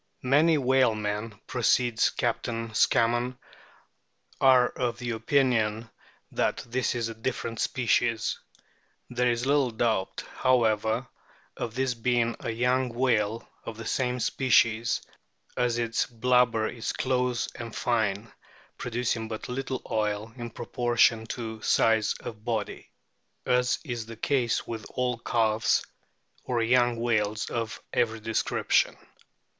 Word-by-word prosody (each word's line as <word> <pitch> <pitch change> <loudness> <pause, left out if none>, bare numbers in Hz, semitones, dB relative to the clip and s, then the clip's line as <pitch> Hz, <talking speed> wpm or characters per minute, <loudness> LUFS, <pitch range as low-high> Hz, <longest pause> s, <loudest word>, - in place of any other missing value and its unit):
" - - -44
Many 160 +1 +5
whalemen," 110 -5 +1
proceeds 120 -1 +2
Captain 115 -1 -2
Scammon, 120 +3 +2 1.0
"are 130 -2 +6
of 120 -2 -2
the 120 -1 -4
opinion 115 -2 +1 0.4
that - - -1
this 125 +1 -1
is 115 -2 -1
a 115 - -5
different 115 0 -4
species. 115 -2 +1 0.7
There 125 0 +1
is 120 +1 0
little 140 -2 +3
doubt, 110 -4 -1
however, 115 -1 +2 0.5
of 115 -1 -5
this 130 0 0
being 120 0 0
a - - -4
young 125 +3 +1
whale 115 -3 0 0.2
of 115 - -7
the 115 - -7
same 125 0 -1
species, 115 -2 +2 0.5
as 120 -1 +1
its 115 -1 0
blubber 120 -2 +2
is 115 -2 -4
close 125 -2 0
and 115 -2 -8
fine, 110 -2 0 0.5
producing 120 -1 -2
but 110 +1 -6
little 130 0 -3
oil 105 0 -1
in 120 -2 -6
proportion 120 -1 +1
to 110 -2 -5
size 110 -2 +3
of 110 -2 -8
body, 110 -2 -3 0.6
as 125 0 +2
is 120 -6 -5
the 115 -1 -9
case 125 -2 0
with 110 -2 -6
all 125 -2 0
calves 110 -2 +1 0.6
or 120 -2 -1
young 120 0 +3
whales 110 -3 0
of 115 -2 -3
every 115 -1 +1
description." 110 +1 +1
115 Hz, 125 wpm, -27 LUFS, 110-125 Hz, 1.0 s, are